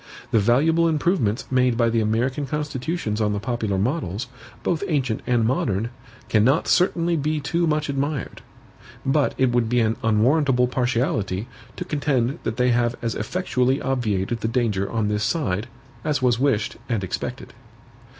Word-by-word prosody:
The 115 Hz, -, +4 dB
valuable 155 Hz, +10 st, +3 dB
improvements 155 Hz, -, +1 dB
made 125 Hz, -2 st, +3 dB
by 115 Hz, -1 st, +3 dB
the 115 Hz, 0 st, +2 dB
American 125 Hz, +6 st, 0 dB
constitutions 150 Hz, -4 st, -2 dB
on 105 Hz, -1 st, +1 dB
the 105 Hz, -, -1 dB
popular 110 Hz, -4 st, -2 dB
models, 110 Hz, -, -1 dB, 0.4 s
both 175 Hz, +1 st, 0 dB
ancient 135 Hz, -, 0 dB
and 120 Hz, -2 st, +2 dB
modern, 115 Hz, -2 st, 0 dB, 0.4 s
cannot 120 Hz, +8 st, +3 dB
certainly 175 Hz, -2 st, +2 dB
be 155 Hz, 0 st, 0 dB
too 170 Hz, +4 st, 0 dB
much 150 Hz, -1 st, 0 dB
admired; 140 Hz, 0 st, -3 dB, 0.6 s
but 140 Hz, +1 st, +2 dB
it 130 Hz, -2 st, +3 dB
would 120 Hz, -2 st, +1 dB
be 125 Hz, +1 st, +2 dB
an 110 Hz, -1 st, +1 dB
unwarrantable 125 Hz, +4 st, +3 dB
partiality, 120 Hz, -5 st, -1 dB, 0.3 s
to -, -, -5 dB
contend 140 Hz, -2 st, 0 dB
that 110 Hz, -, -3 dB
they 125 Hz, 0 st, +3 dB
have 120 Hz, 0 st, +1 dB
as 115 Hz, -, 0 dB
effectually 135 Hz, -7 st, 0 dB
obviated 115 Hz, -4 st, -1 dB
the 110 Hz, -, -1 dB
danger 110 Hz, -5 st, 0 dB
on 110 Hz, -2 st, 0 dB
this 105 Hz, 0 st, 0 dB
side, 110 Hz, -, -1 dB, 0.4 s
as 150 Hz, -2 st, 0 dB
was 125 Hz, -3 st, +2 dB
wished 130 Hz, -6 st, +1 dB
and 115 Hz, -5 st, 0 dB
expected. 95 Hz, -, -5 dB
125 Hz, 155 wpm, -23 LUFS, 110-145 Hz, 0.6 s, The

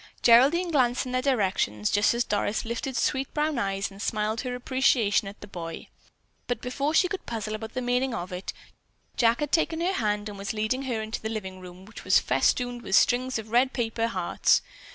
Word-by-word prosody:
Geraldine 280 Hz, +10 st, +5 dB
glanced 255 Hz, -3 st, +2 dB
in 255 Hz, -, -5 dB
their 255 Hz, 0 st, 0 dB
direction 195 Hz, -, 0 dB
just 205 Hz, -, +3 dB
as 240 Hz, -, +1 dB
Doris 205 Hz, 0 st, -1 dB
lifted 235 Hz, +3 st, -3 dB
sweet, 265 Hz, 0 st, 0 dB
brown 300 Hz, -3 st, 0 dB
eyes 195 Hz, -2 st, -2 dB
and 195 Hz, +1 st, -11 dB
smiled 215 Hz, +1 st, -1 dB
her 250 Hz, -2 st, -4 dB
appreciation 245 Hz, -5 st, +2 dB
at 200 Hz, -, -9 dB
the 205 Hz, -, -9 dB
boy. 165 Hz, -4 st, -7 dB, 0.6 s
But 245 Hz, -, -1 dB
before 280 Hz, +5 st, -2 dB
she 365 Hz, -, +5 dB
could 385 Hz, 0 st, -6 dB
puzzle 220 Hz, -2 st, -4 dB
about 220 Hz, +2 st, -6 dB
the 255 Hz, -, -2 dB
meaning 250 Hz, +2 st, +1 dB
of 180 Hz, -2 st, -5 dB
it, 180 Hz, +1 st, -5 dB, 0.6 s
Jack 235 Hz, +2 st, +3 dB
had 295 Hz, -1 st, -2 dB
taken 325 Hz, -1 st, +1 dB
her 355 Hz, +3 st, 0 dB
hand 210 Hz, -, -1 dB
and 205 Hz, -1 st, -8 dB
was 200 Hz, +2 st, -3 dB
leading 220 Hz, +5 st, -1 dB
her 230 Hz, -4 st, -2 dB
into 220 Hz, +1 st, -5 dB
the 220 Hz, -, -3 dB
living 190 Hz, -4 st, -5 dB
room, 180 Hz, +1 st, -12 dB
which 220 Hz, -, -11 dB
was -, -, +5 dB
festooned 245 Hz, -1 st, +1 dB
with 195 Hz, -, 0 dB
strings 255 Hz, +3 st, +3 dB
of 220 Hz, 0 st, -8 dB
red 255 Hz, +3 st, +3 dB
paper 230 Hz, -2 st, -1 dB
hearts. 185 Hz, -6 st, +1 dB
230 Hz, 205 wpm, -26 LUFS, 205-255 Hz, 0.6 s, Geraldine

